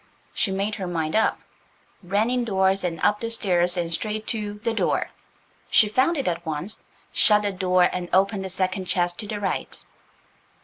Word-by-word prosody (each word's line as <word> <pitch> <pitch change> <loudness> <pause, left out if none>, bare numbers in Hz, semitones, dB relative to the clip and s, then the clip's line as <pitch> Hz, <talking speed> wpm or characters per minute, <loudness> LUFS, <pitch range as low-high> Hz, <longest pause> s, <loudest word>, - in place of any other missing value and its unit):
She - - 0
made 200 +2 -1
her 185 - -2
mind 165 -1 -2
up–ran 215 0 -2
indoors 195 -6 +1
and 170 -2 -2
up 210 0 +2
the 230 - -3
stairs 180 -5 +1
and 170 -1 -1
straight 215 +4 -3
to 210 -3 -3
The 225 +2 -2
Door–she 220 -1 -1
found 265 +10 +2
it 275 - -2
at 170 -1 -1
once–shut 200 +5 0
the 205 - 0
door, 185 -1 +2
and 175 0 -1
opened 195 +1 +2
the 190 - -4
second 185 +1 -1
chest 175 -1 0
to 215 - -3
the 210 0 -4
right. 195 -2 -3
195 Hz, 165 wpm, -24 LUFS, 180-215 Hz, -, up